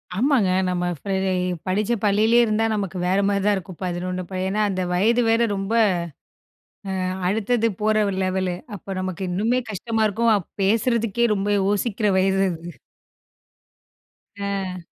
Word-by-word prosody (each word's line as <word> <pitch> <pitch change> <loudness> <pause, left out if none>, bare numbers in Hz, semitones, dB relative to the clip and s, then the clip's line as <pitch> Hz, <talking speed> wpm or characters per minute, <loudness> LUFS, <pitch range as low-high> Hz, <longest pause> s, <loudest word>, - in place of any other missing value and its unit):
ஆமாங்க. 245 -3 +2 0.2
நம்ம 180 -1 -1
ஃப்ரெ 195 +6 -3 0.3
இ - - -1 0.2
படிச்ச 210 +5 +1
பள்ளியிலேயே 220 +4 +4
இருந்தா, 220 +1 +1
நமக்கு 195 -3 -3
வேற 190 +2 +2
மாரிதான் 200 +1 +2
இருக்கும். 185 -2 -9
11 180 +1 -3
அப்ப. 185 - -9
ஏன்னா 205 +3 0
அந்த 185 -1 -2
வயது 225 +7 +3
வேற 230 +1 +3
ரொம்ப 195 +3 -3 1.3
அ 185 - -1 0.2
அடுத்தது 225 +2 +1
போற 215 0 +2 0.2
லெவலு. 185 -1 -1 0.2
அப்போ 195 +1 -7
நமக்கு 185 0 -4
இன்னுமே 225 +7 +1
கஷ்டமா 220 +2 -1
இருக்கும். 230 +3 +2
அ - - +3 0.3
பேசுறதுக்கே 230 +2 +1
ரொம்ப 200 +1 -1
யோசிக்கிற 205 +2 0
வயசு 195 +1 +2
அது. 170 +1 -8 1.7
ஆ. 195 -2 -3
200 Hz, 135 wpm, -23 LUFS, 185-225 Hz, 1.7 s, பள்ளியிலேயே